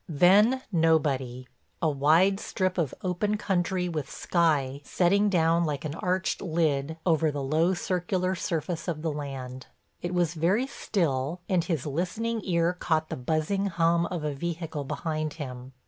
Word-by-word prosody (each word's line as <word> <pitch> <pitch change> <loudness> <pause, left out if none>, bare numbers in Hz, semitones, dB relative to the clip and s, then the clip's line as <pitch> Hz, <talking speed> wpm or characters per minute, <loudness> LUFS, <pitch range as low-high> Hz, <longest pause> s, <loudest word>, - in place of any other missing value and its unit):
Then 205 - +5
nobody—a 145 -5 0
wide 160 +7 +3
strip 185 -3 -1
of 155 -6 -1
open 200 +3 0
country 185 -2 0
with 155 -5 -3
the - - -13
sky 145 -6 +1
setting 200 +7 +2
down 170 -2 +3
like 150 -2 -2
an 150 - -3
arched 185 +3 -1
lid 160 -3 0
over 160 -2 +3
the 145 -2 -3
low 160 +7 +2
circular 185 +1 -1
surface 165 -1 -3
of 160 -3 -3
the 160 - 0
land. 130 -3 -6 0.3
It 175 +1 -3
was 175 -2 +1
very 180 +10 +2
still 165 - -1
and 180 -3 +2
his 165 -7 -2
listening 215 +10 -2
ear 170 -1 +2
caught 160 -3 -1
the - - -3
buzzing 155 +9 0
hum 170 -1 +2
of 175 -4 -4
a 150 -1 -1
vehicle 160 -1 -4
behind 155 +1 -3
him. 130 -4 -7
165 Hz, 155 wpm, -27 LUFS, 150-180 Hz, 0.3 s, Then